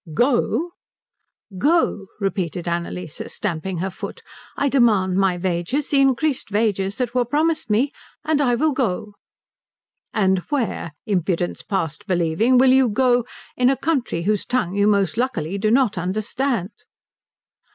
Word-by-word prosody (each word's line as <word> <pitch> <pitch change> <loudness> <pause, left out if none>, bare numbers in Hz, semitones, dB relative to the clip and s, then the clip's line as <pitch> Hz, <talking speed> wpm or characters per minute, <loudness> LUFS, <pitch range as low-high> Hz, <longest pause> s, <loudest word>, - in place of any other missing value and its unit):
"Go," 280 - +1 1.5
repeated 180 -4 -2
Annalise, 170 -1 -4
stamping 185 -1 -3
her 190 +3 -2
foot. - - -8 0.3
"I 285 - +1
demand 215 -9 +3
my 190 -2 +2
wages, 180 - -2
the 280 -2 +4
increased 270 0 +1
wages 205 -1 0
that 245 -2 -2
were 250 -1 +2
promised 310 +4 0
me, 240 +7 +2 0.3
and 310 -2 +2
I 245 -4 +3
will 310 +6 +2
go." 215 -5 -2 1.0
"And 190 -3 +2
where, 235 - -2
Impudence 180 -4 -1
past 190 0 -3
believing, 180 +7 +2
will 260 +1 +6
you 260 -2 +4
go, 245 +1 +2 0.3
in 250 0 +3
a 270 - +1
country 265 - -1
whose 210 +2 +1
tongue 245 -8 -1
you 205 0 +3
most 200 0 +2
luckily 200 -8 -1
do 215 +2 +1
not 230 -5 +2
understand?" 215 +3 -1
215 Hz, 135 wpm, -21 LUFS, 185-255 Hz, 1.5 s, will